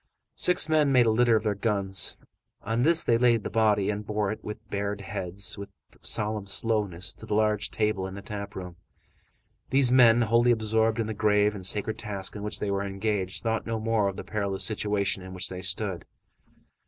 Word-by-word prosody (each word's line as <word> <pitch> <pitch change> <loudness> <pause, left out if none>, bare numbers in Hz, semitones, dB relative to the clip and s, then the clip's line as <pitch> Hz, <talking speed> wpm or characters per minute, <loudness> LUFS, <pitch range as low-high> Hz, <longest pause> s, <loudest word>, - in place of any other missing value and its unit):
Six 180 -2 +3
men 155 -3 +3
made 125 -2 +5
a 110 - +3
litter 120 +1 +3
of 110 - +1
their 105 -2 +1
guns; 100 -2 0 0.5
on 115 +3 -1
this 165 +5 +4
they 115 -1 +2
laid 120 -3 +3
the - - -5
body, 105 -3 +2
and 105 0 -4
bore 105 -1 -1
it, 110 - -7
with 105 +1 -8
bared 100 0 -3
heads, 100 0 -3
with 100 - -7 0.3
solemn 105 -1 -1
slowness, 100 -5 0
to 110 - -12
the 105 - -1
large 105 -1 +1
table 105 -3 -1
in 95 - -8
the 100 - -9
tap 100 -1 -7
room. 90 -2 -8 0.9
These 135 -2 +4
men, 120 -2 +6
wholly 115 +2 +3
absorbed 110 0 +2
in 115 - 0
the 110 - -4
grave 105 0 +2
and 100 -3 -8
sacred 105 +3 -2
task 100 -3 -4
in 105 - -6
which 105 +1 -3
they 100 - -2
were 100 0 0
engaged, 100 -1 -2
thought 110 -1 -1
no 115 -1 -2
more 110 -2 +1
of 95 - -4
the - - -6
perilous 100 -2 -2
situation 105 -3 0
in 95 0 -9
which 90 - -2
they 90 -1 -6
stood. 95 0 -2
105 Hz, 205 wpm, -27 LUFS, 100-115 Hz, 0.9 s, men